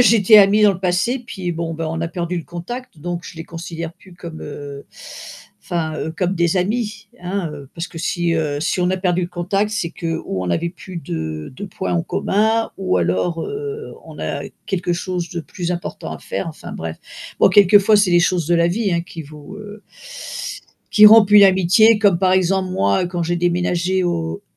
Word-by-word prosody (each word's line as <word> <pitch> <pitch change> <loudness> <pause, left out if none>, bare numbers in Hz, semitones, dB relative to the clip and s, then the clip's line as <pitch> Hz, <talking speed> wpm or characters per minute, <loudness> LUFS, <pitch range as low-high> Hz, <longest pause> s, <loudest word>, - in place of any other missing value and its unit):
j'étais 220 -2 +6
amie 205 +1 +5
dans 205 - +6
le 185 - -9
passé 195 +8 0
puis 185 -6 -4
bon, 165 0 -3
bah, 160 0 -3
on 165 0 -3
a 165 - -2
perdu 175 0 -3
le 165 - -7
contact, 175 +4 -8
donc 175 +1 -4
je - - -9
les 165 - -7
considère 165 -1 -7
plus 185 - -18
comme, 170 -2 -9
heu 145 -1 -8 0.8
enfin, 160 -3 -2
heu, 160 - -3
comme 185 +1 -1
des 170 0 +1
amis, 215 +2 -2
hein, 180 -1 -2
heu, 145 -2 -10
parce 170 0 -4
que 165 - -14
si, 170 +1 -1
heu, 150 -3 -1
si 180 - -1
on 180 0 +2
a 190 - 0
perdu 180 -1 0
le 175 - -3
contact 195 +4 -1
c'est 175 -6 -2
que 165 - -5 0.2
ou 95 -1 -3
on - - -4
n'avait 165 - 0
plus 185 0 -11
de 80 - -5
de - - -6
points 90 - -4
en 85 - +1
commun 220 +3 0
ou 190 - 0
alors, 95 - 0
heu, 430 +1 -6
on - - -12
a - - -3 0.3
quelque 180 -2 -1
chose 175 0 -4
de 175 - -4
plus 175 +2 -5
important 175 0 -6
à - - -7
faire, - - -4
enfin, - - -9
bref, - - -5 0.4
bon, - - +7
quelquefois 205 +1 +6
c'est 205 -3 +3
les 175 - +6
choses 175 -3 +1
de 175 - +3
la 170 - +3
vie, 200 +2 0
hein, 170 0 0
qui 170 -2 -9
vous, 150 +5 -12
heu, 210 0 -10 1.1
qui 210 0 +8
rompent 215 -1 +8
une 205 -1 +9
amitié 195 +4 +5
comme, 200 -5 +3
par 185 0 +2
exemple, 185 0 +2
moi, 100 - +1
quand 175 -1 -3
j'ai 175 +1 -1
déménagé 175 +1 0
aux 80 - -2
175 Hz, 210 wpm, -19 LUFS, 165-200 Hz, 1.1 s, une